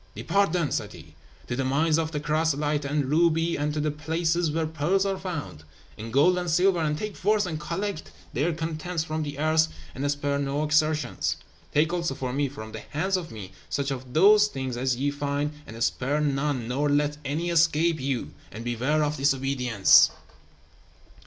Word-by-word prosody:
"Depart 200 -3 +1
then," 170 -4 0
said - - -2
he, - - -13 0.3
"to 120 - -3
the 135 - -1
mines 155 +5 +2
of 160 -1 -2
chrysolite 150 -1 0
and 145 0 0
ruby, 165 +3 +2
and 150 +1 -1
to 150 - -3
the 150 0 0
places 165 +2 0
where 160 +1 -1
pearls 160 +5 0
are 195 -1 -1
found, 165 - -6 0.3
and 115 +1 -8
gold 170 +8 +4
and 175 -1 -3
silver, 180 +2 +3
and 150 -2 0
take 210 +4 -5
forth 210 +1 +2
and 160 -4 -4
collect 190 +4 -4 0.2
their 150 +7 +1
contents 160 +1 -3
from 155 0 -3
the 145 -2 -5
earth, 155 +1 +3 0.3
and 140 +2 -2
spare 145 0 -1
no 140 +1 -1
exertions. 155 0 +1 0.3
Take 155 +3 +2
also 170 -5 -1
for 130 -2 -4
me, 140 0 0
from 110 -5 -9
the 110 - -6
hands 185 - -2
of 175 -3 -3
me, 100 -6 -9 0.2
such 140 0 -1
of 130 -1 -6
those 210 +5 +6
things 130 -9 -4
as 130 +1 0
ye 140 +3 0
find, 145 +1 -2 0.2
and 115 +1 -4
spare 140 +5 0
none, 140 -4 0
nor 140 +4 0
let 145 +1 +1
any 155 +5 -2
escape 165 0 +3
you; 135 -2 -2 0.2
and 110 +3 -7
beware 130 +6 +1
of 150 +1 -1
disobedience!" 135 -6 +4
150 Hz, 185 wpm, -26 LUFS, 140-165 Hz, 0.3 s, those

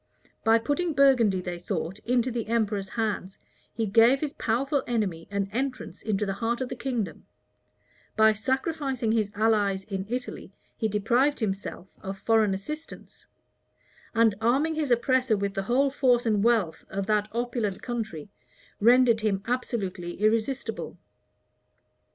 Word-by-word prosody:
By 225 +1 +5
putting 305 +8 -1
Burgundy, 250 -9 +4
they 175 -1 -5
thought, 175 +1 -4
into 245 +2 0
the 235 -2 -3
emperor's 210 -4 0
hands, 210 -4 -3 0.3
he 225 - -2
gave 230 +6 +5
his 295 -1 -3
powerful 270 +5 0
enemy 200 -9 -2
an 200 -1 -1
entrance 255 +3 -4
into 210 -1 -1
the 195 - -2
heart 230 +4 -1
of 260 -1 -3
the - - -4
kingdom: 240 -5 -4 0.9
by 220 0 +5
sacrificing 265 +1 -1
his 220 -2 +1
allies 205 -3 +2
in 195 -1 -5
Italy, 250 +1 -5 0.2
he 220 - -1
deprived 235 +8 +1
himself 195 -3 -4
of 195 0 -5
foreign 215 -1 +2
assistance; 305 +11 -9 0.9
and, 225 -2 +4
arming 270 +8 +2
his 310 -3 -1
oppressor 250 -1 +2
with 200 0 -2
the 195 - -1
whole 270 +3 +3
force 250 -3 +2
and 210 -3 +2
wealth 220 -8 +1
of 195 0 -3
that 210 0 +1
opulent 235 -4 -2
country, 220 -11 -4 0.5
rendered 235 0 +5
him 200 -3 0
absolutely 200 -8 -3
irresistible. 225 +5 -1
225 Hz, 140 wpm, -27 LUFS, 200-250 Hz, 0.9 s, By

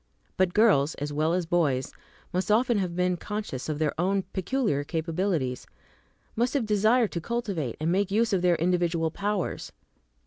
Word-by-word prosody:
But 185 -1 +1
girls, 190 -10 +4
as 145 0 -4
well 155 +2 +1
as 180 0 0
boys, 155 -7 0 0.4
must 185 +4 -1
often 230 +1 +3
have 180 -3 -2
been 180 0 +1
conscious 205 -9 -5
of 155 - -1
their 155 -1 0
own 195 +2 +1
peculiar 190 - 0
capabilities, 160 -4 -2 0.7
must 240 +5 0
have 265 -5 +1
desired 215 +2 +3
to 170 - -3
cultivate 200 - -3
and 160 +2 0
make 195 +2 +1
use 220 +2 +1
of 190 - +2
their 180 -1 +3
individual 170 -1 +1
powers. 200 +1 -3
180 Hz, 165 wpm, -27 LUFS, 160-210 Hz, 0.7 s, girls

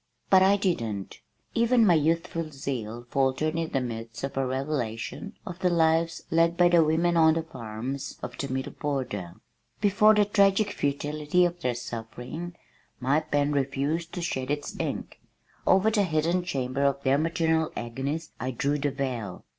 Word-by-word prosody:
But 190 -1 +7
I 195 +2 +5
didn't! 115 - -2 0.3
Even 235 0 +4
my 180 - +6
youthful 165 +1 0
zeal 120 -5 -5
faltered 135 +4 +1
in 165 -1 -1
the 135 - +1
midst 115 -1 -6
of 135 0 -3
a 135 - +1
revelation 130 - -3
of 180 -3 -7
the 185 -2 +2
lives 165 -1 +2
led 165 +1 +3
by 175 -1 +6
the 170 -2 +5
women 165 +3 +2
on 160 -1 +5
the 165 - -1
farms 125 -1 -6
of 125 0 -5
the 140 -2 -3
middle 130 0 -2
border. 125 - -3 0.4
Before 210 +1 +5
the 210 0 +4
tragic 200 0 +3
futility 150 +3 0
of 175 0 -2
their 125 -4 0
suffering, 125 +9 -6 0.4
my 135 +4 +2
pen 145 -2 0
refused 145 +4 -1
to 175 - -4
shed 130 -6 -2
its 145 0 -3
ink. - - -4 0.5
Over 195 +4 +5
the 215 -2 +2
hidden 170 0 +1
chamber 135 -5 -2
of 140 0 +1
their 135 +1 +3
maternal 160 0 +1
agonies 135 +7 -4
I 130 - -2
drew 140 +4 0
the 145 +1 +1
veil. 125 -9 -4
150 Hz, 165 wpm, -27 LUFS, 130-170 Hz, 0.5 s, But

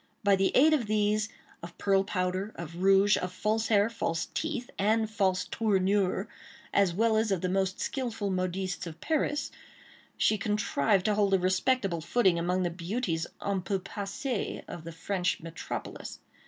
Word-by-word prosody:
By 200 -1 +5
the 195 0 +2
aid 310 +4 +6
of 255 -8 +1
these, 210 0 +1 0.3
of 170 0 -10
pearl 195 -1 +3
powder, 185 +1 -2
of 170 0 -7
rouge, 195 +2 +5
of 180 - -3
false 215 +4 0
hair, 205 -1 +4
false 170 -7 -2
teeth, 305 -6 -3
and 220 +2 +2
false 195 -4 0
tournure, 195 -2 +1 0.5
as 200 -3 +4
well 220 +4 +2
as 220 -1 +1
of 190 -3 0
the 185 - 0
most 190 0 0
skilful 225 -6 -2
modistes 185 0 -2
of 160 -1 -9
Paris, 300 -2 -1 0.7
she 215 - +2
contrived 210 -2 +1
to 215 - +3
hold 200 -2 +3
a - - +4
respectable 185 0 +1
footing 180 0 +2
among 180 +2 0
the 175 - 0
beauties 175 -1 -2 0.2
en 200 -2 0
peu 195 +2 -1
passées 205 +6 -4
of 165 -2 -8
the 165 - -6
French 180 +1 -1
metropolis. 165 0 -6
195 Hz, 165 wpm, -29 LUFS, 180-215 Hz, 0.7 s, aid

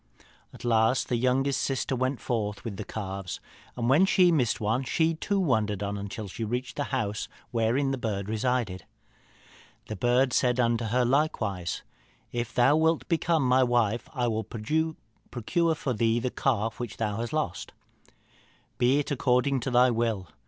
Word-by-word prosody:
"At - - -11
last 115 +1 +2
the 125 - +1
youngest 130 +3 +1
sister 135 0 -1
went 130 +1 -1
forth 105 -4 -2
with 105 -4 -5
the - - -4
calves, 95 -3 -5 0.4
and 120 -1 -1
when 155 +9 +5
she 180 -2 +5
missed 130 -8 +1
one 110 +5 0
she 160 +5 +1
too 200 +5 -1
wandered 110 - +1
on 100 0 -2
until 100 +1 -5
she 105 +4 -6
reached 125 +4 -3
the 145 - -1
house 110 -6 -2 0.2
wherein 120 +4 +1
the 135 - -2
bird 100 -4 -3
resided. 110 -4 -1 1.0
The 110 - -3
bird 125 +5 +2
said 125 -1 +2
unto 115 -1 +2
her 125 +3 +1
likewise, 110 - 0 0.5
'If 120 -1 -3
thou 135 +5 +4
wilt 160 +1 +2
become 165 -4 +2
my 130 +1 +4
wife, 120 -2 +1
I 125 -4 -1
will 110 -1 -1
procure 155 +4 -2
for 135 -3 -2
thee 115 +1 +2
the 125 +1 -2
calf 115 -4 -1
which 120 -3 -5
thou 105 -2 -1
hast 115 +1 -3
lost.' 125 - -2 1.1
'Be 125 +3 +4
it 145 - -1
according 130 0 +2
to 125 - -3
thy 125 0 +5
will.' 110 -6 -1
120 Hz, 165 wpm, -27 LUFS, 110-135 Hz, 1.1 s, when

